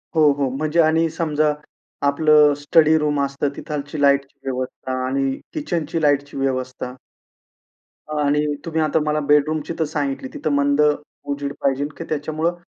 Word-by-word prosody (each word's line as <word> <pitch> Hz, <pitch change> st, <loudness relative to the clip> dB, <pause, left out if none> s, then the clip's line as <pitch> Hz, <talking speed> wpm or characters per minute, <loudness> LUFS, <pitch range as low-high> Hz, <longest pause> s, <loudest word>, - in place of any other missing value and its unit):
हो, 155 Hz, -2 st, +6 dB
हो, 140 Hz, -2 st, -1 dB
म्हणजे 155 Hz, +3 st, 0 dB
आणि 160 Hz, +1 st, +3 dB
समजा 155 Hz, -2 st, 0 dB, 0.5 s
आपलं 150 Hz, 0 st, +5 dB
स्टडी 155 Hz, +2 st, +4 dB
रूम 150 Hz, -1 st, 0 dB
असतं 140 Hz, +1 st, -2 dB
तिथालची 145 Hz, -1 st, -5 dB
लाईटची 140 Hz, 0 st, +2 dB
व्यवस्था 130 Hz, 0 st, -4 dB, 0.2 s
आणि 135 Hz, 0 st, -1 dB
किचनची 170 Hz, -, -2 dB
लाईटची 145 Hz, -2 st, +1 dB
व्यवस्था. 130 Hz, -1 st, -2 dB, 1.3 s
आणि 145 Hz, +1 st, +2 dB, 0.2 s
तुम्ही 160 Hz, -1 st, -1 dB
आता 155 Hz, +1 st, +2 dB
मला 150 Hz, 0 st, +1 dB
बेडरूमची 150 Hz, +2 st, +2 dB
तर -, -, +3 dB
सांगितली, 140 Hz, -3 st, -3 dB
तिथं 155 Hz, -, -2 dB
मंद 140 Hz, +1 st, +2 dB, 0.4 s
उजेड 140 Hz, 0 st, -3 dB
पाहिजे 140 Hz, +1 st, +1 dB
की 165 Hz, -, -5 dB
त्याच्यामुळं 155 Hz, +3 st, -1 dB
145 Hz, 135 wpm, -21 LUFS, 140-155 Hz, 1.3 s, हो